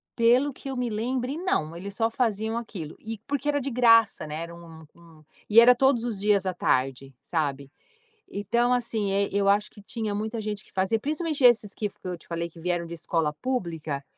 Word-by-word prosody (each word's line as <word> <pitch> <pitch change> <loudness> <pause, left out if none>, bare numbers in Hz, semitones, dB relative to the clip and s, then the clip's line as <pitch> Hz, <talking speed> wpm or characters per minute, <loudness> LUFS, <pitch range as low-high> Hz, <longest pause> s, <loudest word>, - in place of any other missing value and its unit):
pelo 250 +5 +4
que 270 - -9
eu 265 - -4
me 250 -1 -1
lembrei 250 +6 -2
não, 165 - -1
eles 195 +3 -7
só 225 0 +1
faziam 225 -1 -1
aquilo, 190 -9 -6
e 225 0 -6
porque 285 0 -2
era 290 -1 +2
de 275 - -3
graça, 230 -7 +4
né, 150 - -5
era 170 - -8
um 165 -2 -13
um 165 -2 -18 0.3
e 220 +2 +8
era 245 +1 +8
todos 255 -2 +3
os 230 -5 -3
dias 200 -2 +2
à 185 - 0
tarde, 135 -4 0
sabe. 140 -4 -2 0.6
Então 235 +5 +1
assim, 230 -5 -1
eh, 200 0 +1
eu 200 0 +1
acho 205 +1 +2
que 205 - -14
tinha 215 0 -4
muita 220 +2 -3
gente 210 -1 -4
que - - -21
fazia 190 +4 +1
principalmente 305 +1 -2
esses 225 -5 +5
que 210 - -3
que 190 - -12
eu 180 - -4
te - - -18
falei 170 0 -3
que 165 - -15
vieram 175 0 -1
de 170 - -8
escola 165 -2 -1
pública, 165 - -3
210 Hz, 210 wpm, -26 LUFS, 170-240 Hz, 0.6 s, e